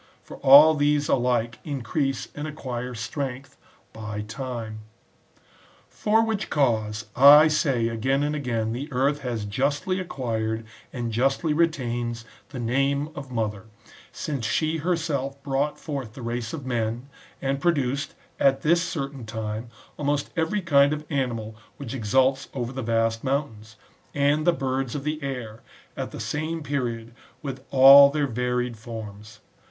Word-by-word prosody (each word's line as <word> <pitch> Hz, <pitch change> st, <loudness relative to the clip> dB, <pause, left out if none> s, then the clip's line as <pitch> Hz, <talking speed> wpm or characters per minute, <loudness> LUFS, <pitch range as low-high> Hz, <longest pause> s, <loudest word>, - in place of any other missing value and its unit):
For -, -, -11 dB
all 145 Hz, +4 st, +8 dB
these 145 Hz, -1 st, +1 dB
alike 120 Hz, -2 st, +1 dB
increase 135 Hz, -1 st, -2 dB
and 145 Hz, +1 st, -5 dB
acquire 125 Hz, -5 st, -5 dB
strength 130 Hz, +3 st, -5 dB, 0.4 s
by 105 Hz, -1 st, -5 dB
time. 115 Hz, -1 st, -6 dB, 1.1 s
For 220 Hz, +2 st, +2 dB
which 220 Hz, -3 st, -2 dB
cause, 110 Hz, -6 st, 0 dB, 0.2 s
/ 150 Hz, +2 st, +9 dB
say 130 Hz, -7 st, +1 dB
again 130 Hz, +5 st, 0 dB
and 150 Hz, +1 st, -1 dB
again, 115 Hz, -6 st, -2 dB
the 140 Hz, +5 st, -5 dB
earth 135 Hz, +3 st, +1 dB
has 120 Hz, -6 st, -3 dB
justly 140 Hz, -, -1 dB
acquired, 115 Hz, -9 st, -3 dB, 0.3 s
and 120 Hz, -2 st, -4 dB
justly 135 Hz, +7 st, +1 dB
retains, 120 Hz, -7 st, -1 dB, 0.2 s
the 135 Hz, -, -8 dB
name 135 Hz, +5 st, 0 dB
of 135 Hz, -, -8 dB
mother, 110 Hz, -3 st, -2 dB, 0.5 s
since 140 Hz, -5 st, -4 dB
she 155 Hz, +8 st, 0 dB
herself 145 Hz, -5 st, -2 dB
brought 140 Hz, +2 st, -1 dB
forth 135 Hz, -8 st, -5 dB
the 125 Hz, -, -9 dB
race 115 Hz, -1 st, -3 dB
of 145 Hz, -5 st, -6 dB
men, 120 Hz, 0 st, -2 dB, 0.3 s
and 135 Hz, 0 st, -2 dB
produced, 140 Hz, -5 st, 0 dB, 0.2 s
at 135 Hz, 0 st, +3 dB
this 170 Hz, +2 st, +4 dB
certain 140 Hz, -6 st, -4 dB
time, 110 Hz, +1 st, -5 dB, 0.3 s
almost 145 Hz, 0 st, -1 dB
every 170 Hz, +5 st, 0 dB
kind 140 Hz, -3 st, +4 dB
of 150 Hz, 0 st, -5 dB
animal 115 Hz, -6 st, -2 dB, 0.2 s
which 135 Hz, -4 st, -7 dB
exults 130 Hz, +3 st, +1 dB
over 120 Hz, -2 st, -3 dB
the 130 Hz, -, -4 dB
vast 115 Hz, -1 st, 0 dB
mountains, 115 Hz, -6 st, -3 dB, 0.4 s
and 145 Hz, +3 st, +2 dB
the -, -, +7 dB
birds 135 Hz, -4 st, -2 dB
of 140 Hz, -, -4 dB
the 155 Hz, +1 st, -3 dB
air, 125 Hz, -5 st, -5 dB, 0.3 s
at -, -, -4 dB
the -, -, -9 dB
same 155 Hz, +2 st, -3 dB
period, 120 Hz, -5 st, -3 dB, 0.3 s
with 135 Hz, -2 st, -6 dB
all 135 Hz, +1 st, +9 dB
their 145 Hz, 0 st, 0 dB
varied 125 Hz, -1 st, -1 dB
forms. 110 Hz, -1 st, -9 dB
135 Hz, 145 wpm, -25 LUFS, 115-145 Hz, 1.1 s, /